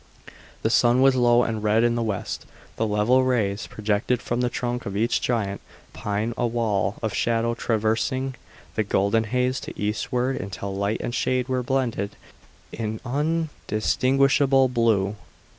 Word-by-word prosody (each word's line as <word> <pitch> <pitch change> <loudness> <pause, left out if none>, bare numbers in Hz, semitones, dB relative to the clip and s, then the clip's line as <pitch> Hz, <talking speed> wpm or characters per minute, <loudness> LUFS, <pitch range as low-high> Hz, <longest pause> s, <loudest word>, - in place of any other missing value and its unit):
The - - +2
sun 120 +2 +4
was 135 0 +6
low 120 -1 +4
and 110 -2 -2
red 110 +2 +3
in 120 0 +3
the 120 - -1
west; 105 -4 -3 0.3
the 110 - 0
level 105 +5 +3
rays 110 -5 0
projected 105 +3 0
from 120 +1 -2
the 125 - +1
trunk 120 0 -3
of 100 0 -3
each 115 +3 +1
giant 105 -5 -1 0.3
pine 105 +3 -2
a 120 - 0
wall 110 -4 0
of 110 -3 -1
shadow 115 0 +1
traversing 115 +4 0 0.4
the - - 0
golden 100 +2 +1
haze 125 +3 0
to - - -9
eastward 125 +5 -1
until 95 +1 -5
light 100 +2 -1
and 120 - -3
shade 125 +1 0
were 130 -1 0
blended 120 -6 -1 0.6
in 110 -1 -3
undistinguishable 135 -2 +2
blue. 110 -4 +1
115 Hz, 150 wpm, -24 LUFS, 105-125 Hz, 0.6 s, was